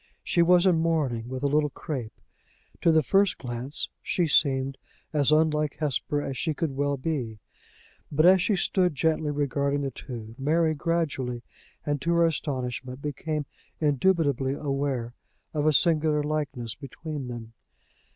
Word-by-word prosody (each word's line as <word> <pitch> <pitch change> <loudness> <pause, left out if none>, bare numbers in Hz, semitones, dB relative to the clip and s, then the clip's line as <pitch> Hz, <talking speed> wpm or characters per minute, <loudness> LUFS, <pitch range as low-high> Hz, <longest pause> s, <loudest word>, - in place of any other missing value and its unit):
She 170 - +2
was 175 +1 +5
in 180 -4 +4
mourning, 145 -8 0
with 130 +1 -5
a - - +3
little 150 +1 +2
crape. 130 -5 -6 0.6
To 165 - +5
the 160 -1 +4
first 195 +3 +3
glance 125 +3 -3
she 175 - 0
seemed 135 -3 +2 0.3
as 145 -1 +3
unlike 155 -1 +2
Hesper 145 0 -1
as 135 -2 -4
she 160 -3 -1
could 155 -4 -2
well 145 0 0
be; 130 -6 -3 0.7
but, 155 +2 +3
as 185 0 +7
she 205 - +2
stood 180 -2 +1
gently 160 0 +1
regarding 140 0 0
the 135 -1 -2
two, 115 -3 -8
Mary, 160 +3 +2
gradually, 145 -7 -2 0.4
and 145 -2 -1
to 170 +2 +1
her 170 0 +4
astonishment, 130 -4 -3
became 150 +1 -3 0.3
indubitably 145 -3 +2
aware 135 -5 -2 0.4
of 150 -1 0
a - - +6
singular 155 -1 +3
likeness 140 -7 -2
between 145 -1 -7
them. 115 -2 -8
145 Hz, 150 wpm, -27 LUFS, 135-160 Hz, 0.7 s, as